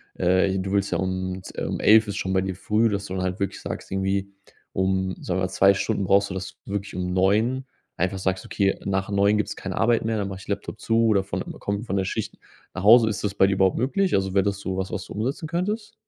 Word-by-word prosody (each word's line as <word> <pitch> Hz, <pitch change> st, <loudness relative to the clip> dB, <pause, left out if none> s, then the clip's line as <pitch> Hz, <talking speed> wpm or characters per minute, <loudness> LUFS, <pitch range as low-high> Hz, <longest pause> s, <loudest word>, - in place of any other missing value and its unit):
äh, 95 Hz, +2 st, +2 dB
du 95 Hz, +1 st, -3 dB
willst 100 Hz, 0 st, +1 dB
ja -, -, +1 dB
um 95 Hz, 0 st, -3 dB
z -, -, -11 dB
um -, -, -3 dB
11:00 110 Hz, +1 st, +6 dB
ist 100 Hz, -, -4 dB
schon 95 Hz, -, -2 dB
bei 95 Hz, -, +3 dB
dir 95 Hz, -1 st, -3 dB
früh, 110 Hz, +4 st, +1 dB
dass 100 Hz, -1 st, -2 dB
du 95 Hz, -, -6 dB
dann 95 Hz, -, -2 dB
halt 90 Hz, 0 st, -2 dB
wirklich 100 Hz, -1 st, -3 dB
sagst -, -, -6 dB
irgendwie 95 Hz, +1 st, -1 dB, 0.4 s
um 95 Hz, 0 st, 0 dB
sagen 95 Hz, 0 st, -2 dB
wir 95 Hz, -, +1 dB
2 95 Hz, +2 st, +5 dB
Stunden 95 Hz, 0 st, -1 dB
brauchst 100 Hz, +1 st, +3 dB
du -, -, -3 dB
das 95 Hz, -1 st, -6 dB
wirklich 100 Hz, 0 st, -4 dB
um 90 Hz, 0 st, -2 dB
9:00 110 Hz, +8 st, +2 dB, 0.3 s
einfach 95 Hz, +3 st, -1 dB
sagst: 95 Hz, 0 st, -1 dB
„Okay, 100 Hz, -1 st, 0 dB
nach 95 Hz, 0 st, -1 dB
9:00 100 Hz, +1 st, +3 dB
gibt's 105 Hz, -, -2 dB
keine 95 Hz, -1 st, -5 dB
Arbeit 115 Hz, 0 st, +2 dB
mehr, 115 Hz, -1 st, 0 dB
dann 100 Hz, -2 st, -2 dB
mache 95 Hz, -1 st, -7 dB
ich -, -, -14 dB
Laptop 100 Hz, +1 st, -4 dB
zu 115 Hz, 0 st, +2 dB
oder 105 Hz, -3 st, +4 dB
von 100 Hz, -, -4 dB
einmal -, -, -9 dB
komme 100 Hz, +1 st, -2 dB
ich -, -, -8 dB
von 100 Hz, -, -1 dB
der 95 Hz, -, 0 dB
Schicht -, -, -4 dB, 0.4 s
nach 95 Hz, -, -5 dB
Hause.“ 110 Hz, +2 st, +7 dB
Ist 105 Hz, -1 st, -3 dB
das 100 Hz, -, -1 dB
bei 95 Hz, -, +5 dB
dir 100 Hz, -, +1 dB
überhaupt 95 Hz, -1 st, +2 dB
möglich? 185 Hz, -, +1 dB
Also, 95 Hz, -1 st, 0 dB
wäre 95 Hz, -, +4 dB
das 100 Hz, -1 st, -1 dB
sowas, 95 Hz, -1 st, -3 dB
was 105 Hz, -, -4 dB
du -, -, -9 dB
umsetzen 130 Hz, -, -3 dB
könntest? 210 Hz, +5 st, -2 dB
100 Hz, 260 wpm, -24 LUFS, 95-105 Hz, 0.4 s, Hause